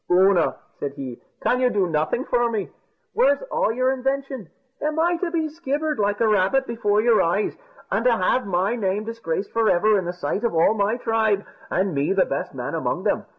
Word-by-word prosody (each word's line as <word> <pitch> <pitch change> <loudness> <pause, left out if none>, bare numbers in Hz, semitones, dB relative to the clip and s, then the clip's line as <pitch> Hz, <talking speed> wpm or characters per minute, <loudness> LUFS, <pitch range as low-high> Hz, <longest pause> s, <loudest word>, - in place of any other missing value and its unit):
"Oonagh," 185 -1 +4 0.2
said 140 -1 -3
he, 130 -4 -7 0.2
"can 250 - +2
you 255 -1 +3
do 200 -5 +1
nothing 160 +8 0
for 240 -1 +1
me? 215 -4 -3 0.4
Where's 285 -11 +3
all - - +1
your 255 +3 +1
invention? 270 - -3 0.3
Am 305 +1 -1
I 345 +1 +2
to 355 0 -2
be 325 -2 -1
skivered 305 -1 -2
like 205 0 0
a 230 - +3
rabbit 210 +6 +2
before 210 -3 +1
your 230 -1 +4
eyes, 185 +5 0 0.4
and 225 - +1
to 240 -2 +4
have 200 +4 +1
my 190 +4 0
name 205 -2 -1
disgraced 215 -5 -4
for 225 -1 +2
ever 210 +3 +3
in 185 - -4
the 175 - -2
sight 180 +4 -3
of 235 -7 0
all 165 +6 +4
my 210 +2 0
tribe, 220 -4 +1 0.2
and 190 0 0
me 145 +6 +1
the 195 - +3
best - - -3
man - - -4
among - - -2
them? - - 0
215 Hz, 205 wpm, -23 LUFS, 190-255 Hz, 0.4 s, Oonagh